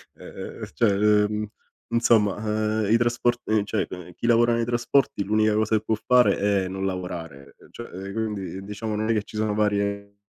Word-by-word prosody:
E -, -, -14 dB
ehm, -, -, -8 dB
cioè, 105 Hz, +8 st, +3 dB
ehm 105 Hz, +1 st, +2 dB, 0.4 s
insomma, 115 Hz, -4 st, +3 dB, 0.5 s
ehm, -, -, 0 dB
i 115 Hz, -, +6 dB
trasporti 120 Hz, -2 st, 0 dB
cioè 100 Hz, -, -1 dB, 0.3 s
chi -, -, -6 dB
lavora 120 Hz, 0 st, +4 dB
nei 115 Hz, 0 st, 0 dB
trasporti 120 Hz, -1 st, +1 dB
l'unica 110 Hz, +1 st, +2 dB
cosa 110 Hz, +1 st, +2 dB
che 110 Hz, -, -5 dB
può 110 Hz, -, 0 dB
fare 125 Hz, +2 st, +4 dB, 0.3 s
è -, -, -3 dB
non 95 Hz, +1 st, -5 dB
lavorare, 85 Hz, -7 st, -6 dB, 0.2 s
cioè 95 Hz, +2 st, -8 dB
quindi 100 Hz, -3 st, -4 dB
diciamo 105 Hz, +2 st, -4 dB
non 110 Hz, +1 st, -1 dB
è -, -, +4 dB
che 110 Hz, -, +1 dB
ci 105 Hz, -, -14 dB
sono 110 Hz, -1 st, 0 dB
varie- 100 Hz, -1 st, -1 dB
105 Hz, 175 wpm, -24 LUFS, 100-115 Hz, 0.5 s, i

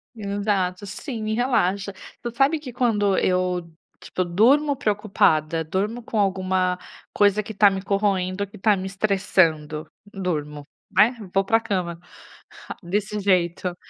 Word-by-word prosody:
Exato, 200 Hz, -2 st, -1 dB
sim, 225 Hz, +3 st, -6 dB
me 215 Hz, 0 st, -1 dB
relaxa. 200 Hz, -5 st, 0 dB, 0.3 s
Tu 240 Hz, -, -4 dB
sabe 285 Hz, +5 st, +3 dB
que 265 Hz, -4 st, -8 dB
quando 210 Hz, -6 st, +1 dB
eu, 180 Hz, -2 st, 0 dB, 0.3 s
tipo, 185 Hz, -, -3 dB
durmo 265 Hz, -, +3 dB
preocupada, 190 Hz, -, +1 dB
durmo 205 Hz, +8 st, -2 dB
com 220 Hz, -1 st, -2 dB
alguma 185 Hz, -2 st, +1 dB, 0.4 s
coisa 205 Hz, 0 st, +3 dB
que 220 Hz, -, -8 dB
tá 205 Hz, 0 st, +6 dB
me 190 Hz, -1 st, -3 dB
corroendo, 195 Hz, -1 st, 0 dB
ou -, -, -5 dB
que 210 Hz, -, -13 dB
tá 210 Hz, +1 st, +3 dB
me 185 Hz, -, -5 dB
estressando, 170 Hz, -6 st, +1 dB, 0.3 s
durmo, 150 Hz, -6 st, -3 dB, 0.3 s
aí 225 Hz, +4 st, +7 dB, 0.2 s
vou 195 Hz, 0 st, +3 dB
pra 225 Hz, +3 st, +3 dB
cama, 180 Hz, -6 st, -3 dB, 0.8 s
desse 205 Hz, +3 st, -2 dB
jeito. 180 Hz, -2 st, +1 dB
195 Hz, 140 wpm, -23 LUFS, 180-215 Hz, 0.8 s, aí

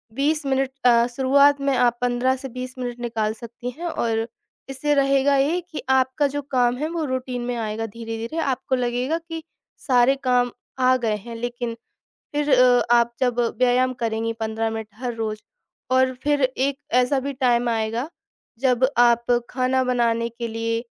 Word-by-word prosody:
20 300 Hz, +3 st, 0 dB
minute 270 Hz, -1 st, +1 dB, 0.2 s
अ, 235 Hz, -1 st, +6 dB
शुरुआत 280 Hz, +2 st, +4 dB
में 275 Hz, -1 st, +1 dB
आप 240 Hz, -1 st, +3 dB
15 245 Hz, +1 st, +1 dB
से 265 Hz, +1 st, -8 dB
20 255 Hz, +1 st, -6 dB
मिनट 245 Hz, -1 st, -4 dB
निकाल 225 Hz, -3 st, -1 dB
सकती 235 Hz, +2 st, -8 dB
हैं 345 Hz, -, -5 dB
और 225 Hz, -7 st, -1 dB, 0.4 s
इससे 270 Hz, +2 st, 0 dB
रहेगा 275 Hz, 0 st, +3 dB
ये 305 Hz, +6 st, +1 dB
कि 310 Hz, -, -5 dB
आपका 265 Hz, +2 st, +2 dB
जो 290 Hz, -, -1 dB
काम 245 Hz, -1 st, +3 dB
है 305 Hz, +4 st, -2 dB
वो 335 Hz, -1 st, -2 dB
रूटीन 255 Hz, -2 st, -3 dB
में 245 Hz, 0 st, -2 dB
आएगा 225 Hz, -1 st, -3 dB
धीरे-धीरे। 225 Hz, +5 st, -6 dB
आपको 265 Hz, -3 st, -1 dB
लगेगा 250 Hz, +5 st, -1 dB
कि 325 Hz, -1 st, -5 dB, 0.4 s
सारे 255 Hz, 0 st, +4 dB
काम 250 Hz, -1 st, +2 dB, 0.3 s
आ 255 Hz, 0 st, +4 dB
गए 225 Hz, -4 st, 0 dB
हैं 230 Hz, +3 st, -9 dB
लेकिन 240 Hz, 0 st, -4 dB, 0.6 s
फिर 295 Hz, 0 st, 0 dB
अ, 250 Hz, -1 st, +5 dB
आप 235 Hz, 0 st, +4 dB
जब 245 Hz, -2 st, +1 dB, 0.2 s
व्यायाम 255 Hz, +1 st, +3 dB
करेंगी 225 Hz, 0 st, -1 dB
15 220 Hz, 0 st, -1 dB
मिनट 220 Hz, -1 st, -5 dB
हर 245 Hz, +1 st, -4 dB
रोज़ 215 Hz, -2 st, -3 dB, 0.5 s
और 260 Hz, 0 st, +3 dB
फिर 290 Hz, -1 st, +1 dB
एक 265 Hz, +2 st, 0 dB, 0.2 s
ऐसा 265 Hz, +2 st, +1 dB
भी 280 Hz, +2 st, -4 dB
टाइम 245 Hz, -2 st, +2 dB
आएगा 225 Hz, +4 st, -1 dB, 0.5 s
जब 255 Hz, -1 st, +3 dB
आप 235 Hz, -1 st, +4 dB, 0.2 s
खाना 260 Hz, 0 st, +1 dB
बनाने 235 Hz, -2 st, +1 dB
के 235 Hz, 0 st, -5 dB
लिए 230 Hz, +1 st, -2 dB
250 Hz, 170 wpm, -23 LUFS, 235-265 Hz, 0.6 s, अ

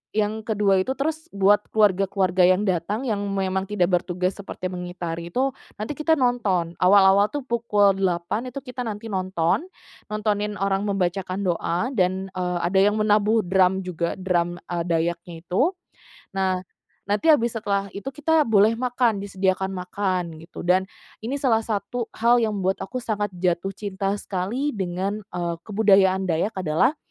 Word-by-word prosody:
yang 215 Hz, 0 st, +1 dB
ke-2 210 Hz, -3 st, +2 dB
itu, 260 Hz, -, -3 dB
terus 315 Hz, +3 st, -2 dB
buat 200 Hz, +1 st, +4 dB
keluarga-keluarga 195 Hz, -3 st, +2 dB
yang 185 Hz, +2 st, +3 dB
datang 190 Hz, +7 st, -1 dB
yang 210 Hz, -3 st, 0 dB
memang 190 Hz, -1 st, -1 dB
tidak 190 Hz, -3 st, +1 dB
bertugas 180 Hz, +1 st, -1 dB
seperti 195 Hz, -2 st, -6 dB
mengitari 175 Hz, -2 st, -5 dB
itu, 265 Hz, +4 st, +1 dB, 0.3 s
nanti 215 Hz, -, -3 dB
kita 320 Hz, +2 st, +2 dB
nonton. 210 Hz, -9 st, +1 dB
Awal-awal 195 Hz, +1 st, +6 dB
tuh 290 Hz, -2 st, -4 dB
pukul 210 Hz, -5 st, +3 dB
8.00 185 Hz, +6 st, -1 dB
itu 275 Hz, -, -5 dB
kita 250 Hz, -1 st, -5 dB
nanti 220 Hz, -1 st, -5 dB
nonton, 185 Hz, -, 0 dB, 0.5 s
nontonin 210 Hz, -1 st, -1 dB
orang 195 Hz, 0 st, 0 dB
membaca 195 Hz, -1 st, 0 dB, 0.2 s
doa 180 Hz, +2 st, -1 dB
dan, 185 Hz, 0 st, +1 dB
eee, 180 Hz, -1 st, -1 dB
ada 190 Hz, +1 st, +2 dB
yang 210 Hz, -, -2 dB
menabuh 215 Hz, +1 st, +3 dB
drum 190 Hz, +1 st, +3 dB
juga, 175 Hz, -1 st, -3 dB
drum, 175 Hz, -2 st, 0 dB
eee, 175 Hz, -1 st, -2 dB
Dayaknya 170 Hz, 0 st, -2 dB
itu. 265 Hz, -, +2 dB, 0.6 s
Nah, 185 Hz, -1 st, 0 dB, 0.4 s
nanti 205 Hz, +10 st, 0 dB
habis 240 Hz, -7 st, +4 dB
setelah 200 Hz, -3 st, -2 dB
itu 200 Hz, +7 st, -6 dB
kita 300 Hz, +1 st, +1 dB
boleh 215 Hz, 0 st, +5 dB
makan, 245 Hz, -4 st, +1 dB
disediakan 190 Hz, -1 st, -1 dB
makan 180 Hz, -3 st, -2 dB
gitu. 165 Hz, +1 st, -10 dB
Dan 185 Hz, +2 st, +2 dB, 0.3 s
ini 240 Hz, +6 st, -3 dB
salah 250 Hz, -5 st, +2 dB
satu 220 Hz, +2 st, -3 dB
hal 235 Hz, +1 st, +4 dB
yang 215 Hz, -2 st, 0 dB
membuat 190 Hz, 0 st, -1 dB
aku 240 Hz, +7 st, -6 dB
sangat 215 Hz, -4 st, -1 dB
jatuh 180 Hz, +2 st, -1 dB
cinta 195 Hz, -1 st, -2 dB
sekali 210 Hz, +10 st, -2 dB
dengan, 190 Hz, +1 st, -3 dB
eee, 175 Hz, -4 st, -4 dB
kebudayaan 195 Hz, -2 st, +4 dB
Dayak 180 Hz, +5 st, -1 dB
adalah 185 Hz, -, +1 dB
195 Hz, 155 wpm, -24 LUFS, 180-220 Hz, 0.6 s, Awal-awal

